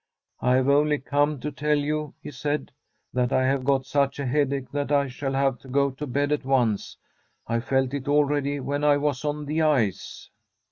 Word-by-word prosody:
* - - -55
I 125 0 +3
have 130 0 +2
only 150 +1 +3
come 145 +1 0
to 150 - -3
tell 150 +2 0
you,' 150 0 -2
he - - -7
said, 145 +3 -3 0.2
* - - -49
that 125 -1 +1
I 130 - +2
have 135 0 +1
got 135 -1 +1
such 140 0 0
a 140 - -3
headache, 135 0 0
that 145 0 -2
I 140 -1 +3
shall 135 +1 -4
have 135 -2 +1
to - - -16
go 140 +1 +1
to 145 +3 -6
bed 145 +3 0
at 150 -1 0
once. 125 -6 0 0.5
I 115 0 0
felt 130 +1 0
it 140 -2 -4
already 145 -1 +1
when 145 +2 -2
I 145 -1 +5
was 145 -2 -1
on 150 0 -2
the 155 +2 -1
ice.' 130 -11 0
140 Hz, 215 wpm, -25 LUFS, 130-145 Hz, 0.5 s, I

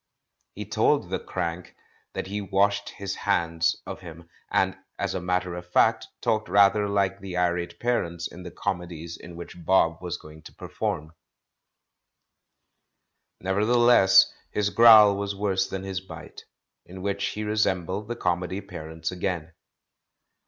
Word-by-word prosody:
He - - -6
told - - +1
the - - -1
crank 85 +1 -5 0.4
that - - -4
he 100 +2 -4
washed 100 +1 +1
his 100 0 -5
hands 85 -4 +1
of - - -7
him, 85 -1 -11 0.2
and - - +1 0.2
as - - -2
a 95 - -3
matter 90 0 -1
of 90 0 -8
fact - - +3
talked 110 -5 0
rather 100 +1 +4
like 100 -1 0
the 95 -2 -6
irate 90 -1 -1
parents 85 -9 -1
in 90 - -12
the 90 - -7
comedies 85 -3 -4
in 85 0 -11
which 85 0 -10
Bob 85 -2 +3
Was 90 -1 -4
going 75 -1 -14
to - - -14
perform. 75 +1 -4 2.3
Nevertheless 105 +2 +5 0.2
his 105 -1 -1
growl 110 -3 +8
was 100 0 -3
worse 95 -1 0
than 95 0 -5
his 95 -1 -3
bite 85 -4 -11
' - - -59
— - - -58
in 95 +1 -9
which 100 0 -2
he 105 - -4
resembled 100 -2 -1
the 120 - -3
comedy 90 -2 -1
parents 80 -4 -6
again. 85 -3 -3
95 Hz, 150 wpm, -26 LUFS, 85-100 Hz, 2.3 s, growl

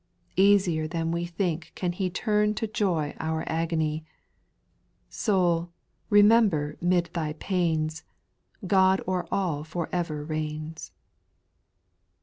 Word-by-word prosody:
' - - -37 0.2
Easier 175 -6 +2
than 165 0 -2
we 170 +1 -2
think 170 -2 -2
can 180 -2 -1
He 185 +1 -2
Turn 210 +3 +1
to 225 - -1
joy 185 -8 -1
our 160 0 -2
agony; 160 -1 -1 1.1
Soul, 175 -4 +1 0.4
remember 205 -8 +4
'mid 175 -1 +1
thy 155 -3 -2
pains, 160 -3 -1 0.6
God 190 0 +4
o'er 180 -2 -1
all 170 -7 -1
for 165 +2 -4
ever 160 -4 -2
reigns 155 0 -5
170 Hz, 115 wpm, -27 LUFS, 155-190 Hz, 1.1 s, remember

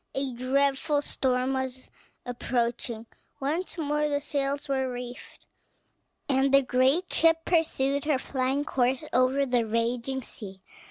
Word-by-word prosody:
A 270 -1 -2
dreadful 275 +3 +1
storm 255 -1 0
was 260 -1 -4 0.3
approaching; 235 -2 -2 0.3
once 320 +7 -2
more 300 -1 0
the 285 -1 +1
sails 280 -1 -2
were 265 -2 0
reefed, 245 0 -8 0.8
and 270 0 +2
the 275 0 +6
great 265 +8 +2
ship 325 0 +3
pursued 280 -5 +1
her 300 -3 +2
flying 265 +2 -1
course 260 0 +1
over 255 +2 +3
the 245 -3 +2
raging 235 +4 -1
sea. 190 -4 -10
265 Hz, 125 wpm, -27 LUFS, 250-285 Hz, 0.8 s, the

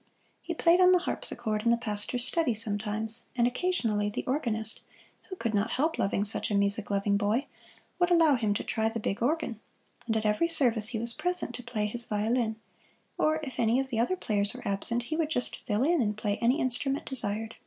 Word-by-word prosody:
He 340 - -5
played 340 +3 +4
on 365 0 +6
the - - +6
harpsichord 215 - 0
in 235 - +2
the 235 - +4
pastor's 235 +2 -2
study 280 -4 +1
sometimes; 215 +1 +1
and 240 -2 +2
occasionally 240 - 0
the 205 - -5
organist, 230 -6 +1 0.5
who 375 - -6
could 230 -10 -3
not 205 +2 0
help 315 +5 0
loving 200 0 0
such 205 - -3
a 205 - -1
music 200 +1 0
loving 200 0 +1
boy, 215 +6 0 0.5
would 350 0 +3
allow 330 -4 +5
him 220 -5 0
to - - -3
try 220 0 -1
the 230 0 -5
big 205 -1 -3
organ, 245 -4 -1 0.5
and 220 -1 0
at 215 - -3
every 210 +10 +2
service 240 -10 +4
he 235 0 -2
was 235 +1 +2
present 360 -5 0
to 245 - -7
play 235 -3 -3
his 235 +3 -3
violin, 220 +2 -1 0.6
or 310 0 +1
if 265 -4 -7
any 230 +2 +2
of 265 0 -3
the 225 - -1
other 245 +11 +1
players 205 - -1
were - - -8
absent 230 +4 0
he 310 +6 -4
would 315 -2 -1
just 245 -6 0
fill 210 +1 +1
in 330 +1 +2
and 210 -2 -1
play 210 -1 -2
any 245 +6 +2
instrument 270 +3 0
desired. 225 -3 -2
235 Hz, 210 wpm, -28 LUFS, 210-270 Hz, 0.6 s, on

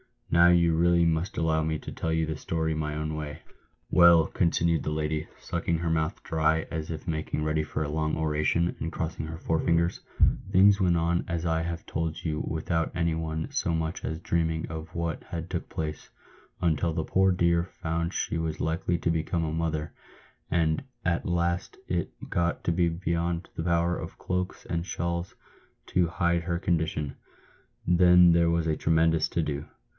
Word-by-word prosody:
"Now 85 +1 +6
you 85 -2 +4
really 85 +1 +4
must 85 +2 0
allow 80 -1 +2
me 80 0 -1
to - - -8
tell 80 - -3
the 80 -1 0
story 80 +1 -1
my 75 -1 -2
own 75 0 -3
way. 75 0 -6 0.5
Well," 85 -3 +7
continued 85 -2 +1
the - - -3
lady, 75 0 -2
sucking 85 -1 -1
her 85 0 -1
mouth 80 -1 -1
dry 80 0 +1
as 80 -2 -4
if 80 -1 -5
making 80 -1 -2
ready 75 0 +1
for 75 0 -3
a 75 - -3
long 75 0 0
ora 75 -1 0
tion, 85 +2 +1
and 80 - -3
crossing 80 -1 -3
her 80 +1 -6
forefingers, 85 +1 +1 0.3
" - - -2
things 100 +2 +6
went 90 -3 +3
on 85 +1 +1
as 85 0 -2
I 80 -1 +1
have 85 0 -4
told 80 -1 -3
you 75 -2 -1
without 80 +1 -1
any 85 -1 +1
one 80 0 -3
so 85 - 0
much 80 +1 -3
as 80 0 -3
dreaming 80 -1 -1
of 80 +1 -7
what 85 -1 -2
had 85 0 -5
took 85 - -3
place, 75 -1 -5 0.5
until 85 -1 +1
the 80 - -1
poor 95 +3 +3
dear 85 -1 +2
found 85 -1 -3
she 85 - -1
was 80 -1 -3
likely 85 +2 0
to 85 - +1
become 80 +1 -1
a 80 - -1
motherland 80 +1 -3 0.2
at 85 -1 0
last 85 0 -1
it - - 0 0.2
got 85 0 0
to - - +1
be 85 0 +2
beyond 85 0 -2
the 80 - -3
power 85 +1 +1
of - - -7
cloaks 90 0 -3
and 85 0 -2
shawls 85 0 -3 0.5
to 90 -2 +2
hide 85 0 0
her 85 0 -1
condi 85 -3 +1
tion. 75 -3 -4 0.7
Then 90 0 +6
there 85 0 +4
was 85 -1 +1
a 80 -1 0
tremendous 80 0 +3
to 85 - 0
do 70 -2 -3
80 Hz, 185 wpm, -27 LUFS, 80-85 Hz, 0.7 s, Well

